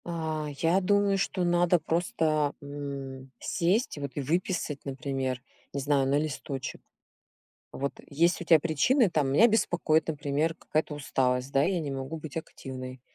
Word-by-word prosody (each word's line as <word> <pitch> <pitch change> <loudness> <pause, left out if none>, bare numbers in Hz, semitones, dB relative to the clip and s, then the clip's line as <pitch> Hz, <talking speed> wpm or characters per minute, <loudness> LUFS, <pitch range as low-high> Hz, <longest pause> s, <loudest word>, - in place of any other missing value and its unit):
А, 160 -3 -2
я 170 +6 +3
думаю, 200 +1 +3
что 190 -1 0
надо 175 0 +3
просто, 160 -3 +1
м, 140 -2 -6
сесть 185 - 0
вот 140 -1 -4
и 145 - -1
выписать, 160 0 -1
например, 135 -2 -2 0.3
не 140 - -2
знаю, 140 -1 +2
на 140 +1 +3
листочек. 140 -3 -4 0.9
Вот 140 +1 -2
есть 170 +6 +2
у - - -7
тя 165 -1 +7
причины, 180 - +3
там: 145 -5 +1
"Меня 220 +12 +7
беспокоит, 175 -8 +2
например, 150 +1 0
какая-то 155 -2 -2
усталость, 130 -2 0
да, 135 - +4
я 180 +2 +1
не 150 -3 -3
могу 135 +4 -4
быть 155 -2 -9
активной". 130 -5 -7
150 Hz, 150 wpm, -28 LUFS, 140-170 Hz, 0.9 s, тя